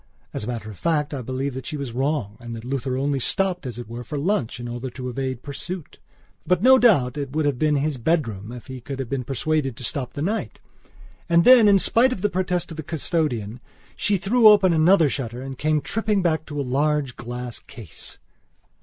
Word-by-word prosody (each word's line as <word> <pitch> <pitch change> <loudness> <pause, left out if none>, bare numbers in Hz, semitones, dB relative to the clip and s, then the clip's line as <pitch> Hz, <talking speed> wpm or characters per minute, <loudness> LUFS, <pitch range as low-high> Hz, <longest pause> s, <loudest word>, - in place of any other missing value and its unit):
As - - -4
a - - -6
matter 115 -3 -5
of 100 - -13
fact, 155 -3 0
I 135 - -3
believe 130 +3 -3
that 130 -1 -7
she 150 - -4
was 140 -4 -5
wrong 130 -4 -1
and 120 -1 -7
that 115 +1 -9
Luther 130 0 -2
only 140 +1 0
stopped, 180 +3 0
as 120 -2 -6
it 120 - -7
were, 120 +2 -7
for 150 +3 -5
lunch, 145 - -1
in 120 - -6
order 120 +2 -5
to 125 0 -6
evade 130 -1 -4
pursuit. 160 +4 -7 0.4
But, 180 +1 +1
no 260 +1 +7
doubt, 150 - +3
it 140 -1 -5
would 155 -1 +1
have 140 -4 0
been 155 -1 +2
his 145 0 0
bedroom 115 - -1
if 125 -1 -9
he 130 -1 -8
could 135 +2 -6
have 135 -3 -5
been 135 -2 -2
persuaded 135 0 -1
to - - -9
stop 125 0 -3
the 145 - -3
night. 210 +6 -2 0.7
And 170 0 +5
then, 245 -2 +8
in 200 -1 +6
spite 235 +6 +3
of 205 - -4
the 205 0 +1
protest 180 -1 -1
of 160 - -8
the - - -3
custodian, 135 - -2 0.4
she 205 -1 +1
threw 220 +5 +4
open 200 -4 +6
another 165 +1 +5
shutter 125 -3 -4
and 135 0 -6
came 155 +3 +1
tripping 210 0 0
back 160 -2 0
to 145 -1 -5
a - - 0
large 140 0 0
glass 120 0 -6
case. 110 - -11
140 Hz, 220 wpm, -23 LUFS, 125-170 Hz, 0.7 s, then